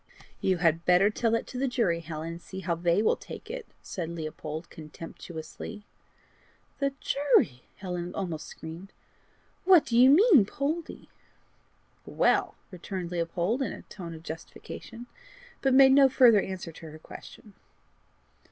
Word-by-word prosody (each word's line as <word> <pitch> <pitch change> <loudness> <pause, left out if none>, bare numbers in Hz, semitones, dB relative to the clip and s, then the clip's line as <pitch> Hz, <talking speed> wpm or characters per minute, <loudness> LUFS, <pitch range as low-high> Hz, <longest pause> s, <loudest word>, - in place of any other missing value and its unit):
"You 185 -1 +1
had 165 -1 +2
better 180 +4 +4
tell 230 +2 0
that 230 0 0
to 250 - -7
the 270 - +1
jury, 220 -10 +1
Helen, 160 -1 -6
and 170 +1 -7
see 190 +1 -8
how 175 -2 -1
they 170 +4 +1
will - - +3
take - - -10
it," - - -6 0.2
said 170 -4 -5
Leopold 160 0 -6
contemptuously. 165 +5 -9 0.9
"The 275 -1 0
jury!" 265 - +2
Helen 180 -2 -5
almost 170 -5 -4
screamed. 165 +5 -10 0.7
"What 365 -4 +6
do 230 - -2
you 250 +2 +7
mean, 320 - +7
Poldie?" 310 +7 -4 1.0
"Well!" - - +2 0.2
returned 180 -1 -6
Leopold, 175 +7 -1
in 270 - -1
a - - -10
tone 170 -5 -9
of 160 - -12
justification, 170 +8 -9 0.6
but 270 - +2
made 265 0 +7
no 270 0 +7
further 240 -5 +6
answer 185 -3 -6
to 160 0 -11
her 155 - -10
question. 200 +5 -13
185 Hz, 145 wpm, -28 LUFS, 165-250 Hz, 1.0 s, you